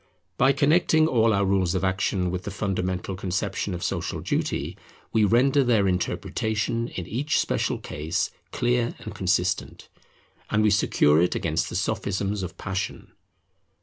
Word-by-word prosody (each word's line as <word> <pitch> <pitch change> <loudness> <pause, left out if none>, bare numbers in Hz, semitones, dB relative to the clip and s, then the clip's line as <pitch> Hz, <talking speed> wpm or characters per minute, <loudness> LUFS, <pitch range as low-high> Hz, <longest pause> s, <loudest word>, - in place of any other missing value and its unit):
By 135 +2 +4
connecting 155 +3 +3
all 115 -6 +3
our 100 -1 +2
rules 95 -2 +1
of 95 - -1
action 95 -1 0
with 90 0 -3
the - - -4
fundamental 95 -2 -2
conception 95 +1 -2
of 85 - -6
social - - -2
duty, - - -2 0.4
we 110 -2 +4
render 130 +6 +4
their 110 -6 +3
interpretation 110 +5 -1
in 90 - -6
each 135 - -1
special - - 0
case 75 +2 -3 0.2
clear 120 0 0
and - - -8
consistent, 95 0 -1 0.6
and 110 0 +2
we 105 - +4
secure 80 -6 +4
it 90 - +1
against 85 +2 -1
the - - -6
sophisms 100 0 -1
of 90 - -6
passion. 95 -1 -4
100 Hz, 150 wpm, -25 LUFS, 90-115 Hz, 0.6 s, By